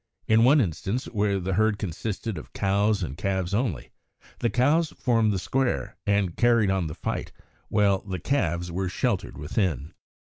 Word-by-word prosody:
In 110 Hz, +1 st, +5 dB
one 140 Hz, +5 st, +6 dB
instance, 105 Hz, -, -2 dB
where 100 Hz, -3 st, 0 dB
the 95 Hz, +1 st, -2 dB
herd 110 Hz, +2 st, +2 dB
consisted 105 Hz, +3 st, -4 dB
of -, -, -13 dB
cows 100 Hz, +1 st, +1 dB
and 70 Hz, -5 st, -4 dB
calves 95 Hz, +1 st, -2 dB
only, 100 Hz, -, -1 dB, 0.5 s
the 120 Hz, -, +1 dB
cows 145 Hz, +7 st, +2 dB
formed 115 Hz, -4 st, +2 dB
the 100 Hz, -, 0 dB
square 120 Hz, -, -1 dB
and 100 Hz, -4 st, +1 dB
carried 115 Hz, -4 st, +3 dB
on 95 Hz, -4 st, 0 dB
the 75 Hz, -, -6 dB
fight -, -, -4 dB, 0.4 s
while 100 Hz, -2 st, +3 dB
the 95 Hz, -2 st, -5 dB
calves 85 Hz, -, -1 dB
were 95 Hz, +1 st, -2 dB
sheltered 100 Hz, 0 st, -1 dB
within. 80 Hz, -, -2 dB
100 Hz, 160 wpm, -26 LUFS, 90-115 Hz, 0.5 s, one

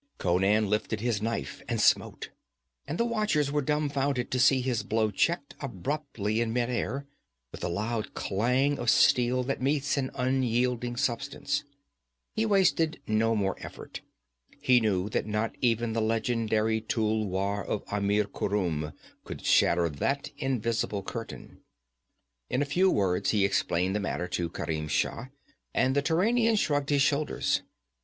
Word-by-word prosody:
Conan 95 Hz, +4 st, +2 dB
lifted 105 Hz, +1 st, -1 dB
his 115 Hz, -2 st, -1 dB
knife 115 Hz, +1 st, -3 dB
and -, -, -1 dB
smote, -, -, +2 dB, 0.6 s
and 155 Hz, -, -3 dB
the 235 Hz, -, +2 dB
watchers 215 Hz, -11 st, +1 dB
were 150 Hz, 0 st, +1 dB
dumbfounded 140 Hz, -3 st, -1 dB
to 125 Hz, -, 0 dB
see 135 Hz, 0 st, +5 dB
his 125 Hz, -3 st, -1 dB
blow 110 Hz, +1 st, 0 dB
checked 140 Hz, -, 0 dB
apparently 120 Hz, -, -2 dB
in 115 Hz, -1 st, -1 dB
midair, 125 Hz, +3 st, -1 dB, 0.5 s
with -, -, -9 dB
the -, -, -1 dB
loud 110 Hz, +5 st, -3 dB
clang 125 Hz, +8 st, +1 dB
of 120 Hz, -, 0 dB
steel 125 Hz, +2 st, +4 dB
that 135 Hz, 0 st, -3 dB
meets 140 Hz, +1 st, +1 dB
an 130 Hz, -1 st, 0 dB
unyielding 125 Hz, -1 st, 0 dB
substance. 135 Hz, +2 st, -1 dB, 0.7 s
He 220 Hz, +1 st, 0 dB
wasted 180 Hz, -6 st, +2 dB
no 115 Hz, +1 st, +2 dB
more 100 Hz, -2 st, 0 dB
effort. -, -, -9 dB, 0.6 s
He 125 Hz, -1 st, +4 dB
knew 100 Hz, -4 st, 0 dB
that 110 Hz, -, -1 dB
not 105 Hz, +1 st, -1 dB
even 120 Hz, -2 st, +1 dB
the 115 Hz, -, 0 dB
legendary 110 Hz, -1 st, 0 dB
tulwar 105 Hz, -3 st, -1 dB
of 105 Hz, -, -3 dB
Amir 105 Hz, +1 st, +1 dB
Khurum 85 Hz, -7 st, -2 dB, 0.3 s
could -, -, -8 dB
shatter 85 Hz, 0 st, +4 dB
that 135 Hz, -, -2 dB
invisible 115 Hz, -5 st, -1 dB
curtain. 115 Hz, +4 st, -8 dB, 0.9 s
In 135 Hz, -, +1 dB
a -, -, -2 dB
few 180 Hz, +7 st, +3 dB
words 95 Hz, -, +1 dB
he 105 Hz, -3 st, +3 dB
explained 95 Hz, -1 st, 0 dB
the -, -, +1 dB
matter 90 Hz, -3 st, -2 dB
to 85 Hz, -1 st, -2 dB
Kerim 80 Hz, -2 st, -3 dB
Shah, 115 Hz, -, -1 dB, 0.5 s
and 130 Hz, +1 st, +2 dB
the 140 Hz, -, +3 dB
Turanian 225 Hz, +10 st, +2 dB
shrugged 145 Hz, -8 st, 0 dB
his 140 Hz, -2 st, +3 dB
shoulders. 145 Hz, +1 st, +1 dB
115 Hz, 145 wpm, -28 LUFS, 105-140 Hz, 0.9 s, see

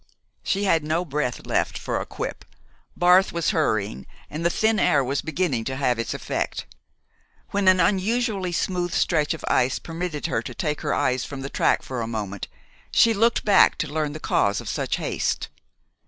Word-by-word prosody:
She 200 Hz, +1 st, -1 dB
had 165 Hz, -6 st, +3 dB
no 160 Hz, +4 st, 0 dB
breath 145 Hz, -5 st, -2 dB
left -, -, 0 dB
for -, -, -2 dB
a -, -, -6 dB
quip. -, -, -5 dB, 0.5 s
Barth 180 Hz, +2 st, +5 dB
was 170 Hz, +2 st, 0 dB
hurrying, 110 Hz, -, -1 dB, 0.2 s
and 155 Hz, +3 st, -4 dB
the 170 Hz, -, +3 dB
thin 220 Hz, +4 st, +2 dB
air 140 Hz, -2 st, +3 dB
was 135 Hz, +2 st, -1 dB
beginning 160 Hz, -7 st, -1 dB
to 130 Hz, -, -3 dB
have 125 Hz, -3 st, 0 dB
its 115 Hz, -, -2 dB
effect. -, -, -3 dB, 0.9 s
When 200 Hz, -1 st, 0 dB
an 185 Hz, 0 st, +6 dB
unusually 200 Hz, +1 st, +1 dB
smooth 175 Hz, 0 st, -1 dB
stretch 155 Hz, -1 st, +1 dB
of 160 Hz, -, -8 dB
ice 125 Hz, +1 st, +2 dB
permitted 165 Hz, -2 st, -5 dB
her 170 Hz, -, 0 dB
to -, -, -8 dB
take 150 Hz, -3 st, -2 dB
her 150 Hz, -, 0 dB
eyes 130 Hz, 0 st, +1 dB
from 140 Hz, -2 st, -7 dB
the 135 Hz, -, -6 dB
track -, -, +2 dB
for 130 Hz, -2 st, -4 dB
a 115 Hz, -, -3 dB
moment 105 Hz, -4 st, -4 dB, 0.4 s
she 230 Hz, -, +5 dB
looked 225 Hz, +2 st, +2 dB
back 205 Hz, -2 st, +5 dB
to 150 Hz, -2 st, -3 dB
learn 155 Hz, -2 st, -1 dB
the 155 Hz, -, -7 dB
cause 100 Hz, -8 st, +1 dB
of -, -, -8 dB
such -, -, -1 dB
haste. -, -, -2 dB
160 Hz, 185 wpm, -24 LUFS, 135-185 Hz, 0.9 s, an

